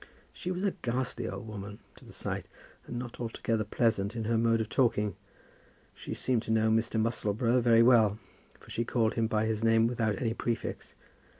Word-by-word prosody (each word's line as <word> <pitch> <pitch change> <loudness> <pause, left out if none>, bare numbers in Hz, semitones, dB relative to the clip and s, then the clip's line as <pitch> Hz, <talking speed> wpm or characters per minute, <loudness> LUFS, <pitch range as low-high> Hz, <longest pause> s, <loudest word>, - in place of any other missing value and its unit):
She 180 - -6
was 185 +1 -2
a 200 - +2
ghastly 125 -1 -2
old 120 - -7
woman 105 -1 -7 0.2
to - - -16
the - - -13
sight, - - -4 0.4
and 120 - -5
not 120 -1 -6
altogether 115 -1 -1
pleasant 105 -1 0
in 115 - -2
her 115 +2 0
mode 115 0 +3
of 110 - -1
talking. 105 -5 +1 0.8
She - - -7
seemed 125 -3 0
to 110 - -4
know 110 0 +3
Mr. 110 0 +1
Musselboro 115 +2 +1
very 115 -1 +5
well, 110 -4 +5 0.4
for - - -15
she 115 - -1
called 115 -2 +1
him 115 -1 +1
by 110 -1 +1
his 110 0 -1
name 115 0 +4
without 115 -3 0
any 115 -3 0
prefix. 115 -1 -4
115 Hz, 190 wpm, -30 LUFS, 110-120 Hz, 0.8 s, very